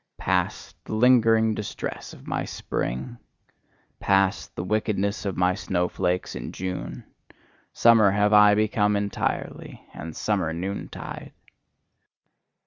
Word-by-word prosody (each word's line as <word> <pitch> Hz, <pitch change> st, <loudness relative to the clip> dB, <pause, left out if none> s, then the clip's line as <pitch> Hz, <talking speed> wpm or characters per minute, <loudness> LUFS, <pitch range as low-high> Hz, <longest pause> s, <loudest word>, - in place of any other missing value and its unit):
Past, -, -, -1 dB
the -, -, -4 dB
lingering 115 Hz, -2 st, +4 dB
distress 105 Hz, -1 st, -5 dB
of -, -, -14 dB
my -, -, -2 dB
spring! 115 Hz, -, -4 dB, 0.8 s
Past, 95 Hz, 0 st, +1 dB
the 85 Hz, -, -3 dB
wickedness 100 Hz, +1 st, -1 dB
of 100 Hz, -, -3 dB
my 90 Hz, 0 st, +3 dB
snowflakes 90 Hz, -1 st, -1 dB
in -, -, -6 dB
June! 90 Hz, 0 st, -5 dB, 0.7 s
Summer 115 Hz, -3 st, +5 dB
have 105 Hz, +2 st, +2 dB
I 105 Hz, 0 st, +7 dB
become 105 Hz, -1 st, +2 dB
entirely, 100 Hz, 0 st, -3 dB
and 80 Hz, 0 st, -8 dB
summer 95 Hz, -7 st, -1 dB
noontide! 95 Hz, +4 st, -6 dB
100 Hz, 110 wpm, -25 LUFS, 95-110 Hz, 0.8 s, I